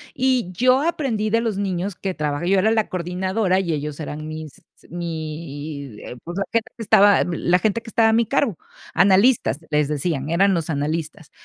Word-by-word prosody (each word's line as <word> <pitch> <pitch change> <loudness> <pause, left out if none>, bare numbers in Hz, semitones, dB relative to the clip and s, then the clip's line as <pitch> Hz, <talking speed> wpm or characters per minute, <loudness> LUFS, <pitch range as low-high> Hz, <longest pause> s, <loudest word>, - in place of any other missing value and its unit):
Y 255 -7 +1
yo 255 +8 +3
aprendí 265 -10 -1
de 230 +2 +2
los 225 -4 -2
niños 190 -1 -2
que 190 -1 -3
trabajé 150 +3 -2
yo 195 - +4
era 220 +3 +3
la 220 -2 +1
coordinadora 185 +2 0
y 170 -4 -1
ellos 150 0 -4
eran 155 0 -6
mis 155 -2 -8 0.3
mi 155 -5 -6
eh, 125 - -8
pues, 175 +3 -7
la 195 - +1
gente 230 -1 0
que 225 - -5
estaba 205 0 +5
la 175 +1 +1
gente 220 +4 0
que 225 - -11
estaba 225 0 +3
a - - +3
mi 230 0 +3
cargo, 270 - 0 0.4
analistas 195 - +4
les 150 -1 +2
decían, 150 -1 -2
eran 190 +4 +3
los 165 -2 -2
analistas. 155 +1 -3
180 Hz, 190 wpm, -22 LUFS, 155-215 Hz, 0.4 s, estaba